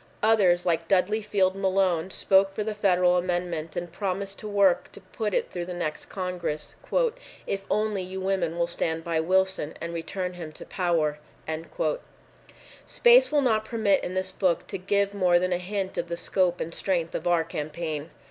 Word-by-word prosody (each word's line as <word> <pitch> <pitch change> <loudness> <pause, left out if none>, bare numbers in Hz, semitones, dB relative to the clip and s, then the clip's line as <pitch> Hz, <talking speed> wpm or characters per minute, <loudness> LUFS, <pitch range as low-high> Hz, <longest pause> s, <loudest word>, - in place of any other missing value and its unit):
Others, 190 -5 +4
like 165 -1 +1
Dudley 195 +4 +2
Field 195 -3 +1
Malone, 190 -3 +1
spoke 195 +1 +3
for 210 - -1
the 215 0 -2
federal 180 -3 +3
amendment, 175 -3 -2
and 175 -1 -4
promised 195 +1 -3
to 215 - -7
work 200 -3 +3
to - - -9
put 210 +3 -4
it - - -1
through 175 -1 -4
the 180 0 -6
next 155 -3 -3
Congress, 180 -5 -4 0.7
"if 195 0 -3
only 210 -2 0
you 185 +1 -5
women 190 -3 -1
will 170 - +2
stand 165 -1 -1
by 165 -1 0
Wilson 190 -2 +1
and 170 0 -5
return 180 +2 -4
him 170 -3 -7
to - - -10
power." 165 -5 0 1.7
Space - - +6
will 295 -2 +3
not 220 -4 +2
permit 220 -4 +1
in 180 - -4
this 185 0 -1
book 185 -2 0
to 195 - -5
give 200 +1 +1
more 180 -3 +4
than 185 +1 +1
a 175 - 0
hint 190 +1 -3
of - - -3
the 170 - -3
scope 180 -1 +1
and 165 - -4
strength 170 -4 -1
of 170 - -3
our 170 -2 +3
campaign. 155 0 -4
185 Hz, 180 wpm, -26 LUFS, 170-195 Hz, 1.7 s, Space